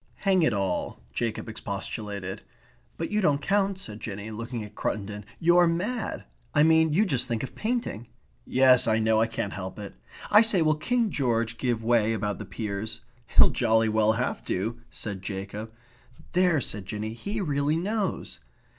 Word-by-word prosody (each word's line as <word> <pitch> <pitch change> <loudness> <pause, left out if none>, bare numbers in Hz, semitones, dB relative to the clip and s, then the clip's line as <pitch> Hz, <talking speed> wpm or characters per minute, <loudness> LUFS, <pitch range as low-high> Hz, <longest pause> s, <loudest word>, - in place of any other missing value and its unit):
"Hang 190 -2 +4
it 155 - +3
all," 95 -4 -2
Jacob 115 -2 -2
expostulated. 100 -2 -5 0.6
"But 165 - -3
you 210 0 +1
don't 150 -6 +3
count," 195 +4 +1
said 110 - -6
Jinny, 105 0 -6
looking 115 +1 -5
at 105 0 -10
Cruttendon. 105 -1 -3
"You're 175 +1 +5
mad. 205 +8 -2 0.3
I 150 - +6
mean, 160 0 +5
you 195 +8 +3
just 130 - 0
think 115 0 -2
of 135 - -6
painting." 220 - -2 0.4
"Yes, 130 - +5
I 110 -1 +3
know. 110 0 +3
I 115 - +3
can't 115 -3 -3
help 95 -1 -6
it. 100 -2 -7 0.4
I 210 +1 +9
say, 215 -7 +3
will 155 0 +4
King 230 +8 0
George 115 -5 0
give 120 -3 0
way 115 -1 +3
about 105 -2 -2
the - - -6
peers?" 110 +1 -5 0.3
"He'll - - +6
jolly 110 0 +2
well 110 0 +3
have 125 +3 -2
to," 110 +6 -2
said 100 -3 -5
Jacob. 100 +3 -5 0.6
"There!" 180 -3 +3
said 100 -4 -5
Jinny. 110 +1 -4
"He 200 - -4
really 145 -4 +1
knows." 200 - -2
115 Hz, 170 wpm, -27 LUFS, 105-165 Hz, 0.6 s, I